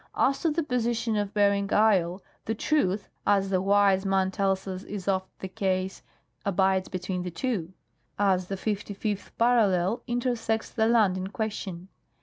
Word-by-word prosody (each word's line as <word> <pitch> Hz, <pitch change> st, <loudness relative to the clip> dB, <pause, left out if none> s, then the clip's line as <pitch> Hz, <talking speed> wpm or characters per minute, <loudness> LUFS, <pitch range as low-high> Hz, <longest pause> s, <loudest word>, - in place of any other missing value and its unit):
"As 275 Hz, +1 st, +2 dB
to 330 Hz, -, +2 dB
the 320 Hz, +2 st, 0 dB
position 235 Hz, -4 st, 0 dB
of 205 Hz, -1 st, -1 dB
Bering 200 Hz, -1 st, +2 dB
isle, 190 Hz, -4 st, +3 dB, 0.2 s
the 225 Hz, -, -1 dB
truth, 210 Hz, -7 st, 0 dB, 0.2 s
as 195 Hz, -1 st, +3 dB
the 185 Hz, -1 st, +2 dB
Wise 195 Hz, -1 st, +3 dB
Man 190 Hz, -1 st, +1 dB
tells 195 Hz, 0 st, 0 dB
us 185 Hz, -1 st, -4 dB
is 200 Hz, -1 st, -7 dB
oft 190 Hz, -1 st, 0 dB
thej3ase, 190 Hz, 0 st, -2 dB, 0.4 s
abides 190 Hz, -1 st, +1 dB
between 185 Hz, 0 st, -3 dB
the 180 Hz, -, -4 dB
two, 185 Hz, -2 st, -3 dB, 0.4 s
as 190 Hz, -3 st, +2 dB
the 195 Hz, -, -3 dB
55th 205 Hz, 0 st, -3 dB
parallel 225 Hz, -3 st, +3 dB
intersects 240 Hz, -2 st, -1 dB
the 220 Hz, -1 st, +1 dB
land 215 Hz, -5 st, +3 dB
in 185 Hz, 0 st, -3 dB
question. 195 Hz, -4 st, -5 dB
200 Hz, 150 wpm, -27 LUFS, 190-220 Hz, 0.4 s, isle